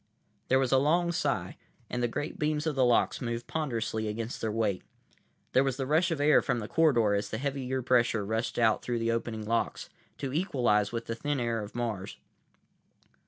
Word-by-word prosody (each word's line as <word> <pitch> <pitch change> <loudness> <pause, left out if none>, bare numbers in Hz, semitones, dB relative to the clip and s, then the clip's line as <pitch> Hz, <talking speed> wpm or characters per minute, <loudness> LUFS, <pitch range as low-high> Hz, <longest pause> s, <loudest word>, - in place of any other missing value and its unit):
There 130 - +4
was 130 -2 +1
a 135 - +5
long 170 +5 +2
sigh, 170 - -1 0.3
and 125 - -3
the 120 - +2
great 145 +6 -4
beams 150 0 0
of 160 - 0
the 135 -2 +2
locks 120 -1 +2
moved 120 -1 -3
ponderously 115 -8 -2
against 115 +3 -4
their 110 - -1
weight. 105 -4 0 0.7
There 130 - +5
was 135 -2 -1
the 135 - -2
rush 160 +6 +2
of 165 -3 -2
air 145 +1 +5
from - - 0
the 105 -2 -4
corridor 120 -11 +3
as 100 0 -1
the 110 - -3
heavier 130 -1 -2
pressure 120 -4 +2
rushed 110 +3 -2
out 115 -2 +3
through 120 -1 -2
the 115 0 0
opening 115 -2 -3
locks, 115 +2 -1 0.3
to 135 -2 -4
equalize 120 - +1
with 115 -1 -4
the 115 - -3
thin 145 +4 -2
air 115 -2 -1
of 105 +2 -9
Mars. 110 -5 -3
120 Hz, 200 wpm, -29 LUFS, 115-140 Hz, 0.7 s, a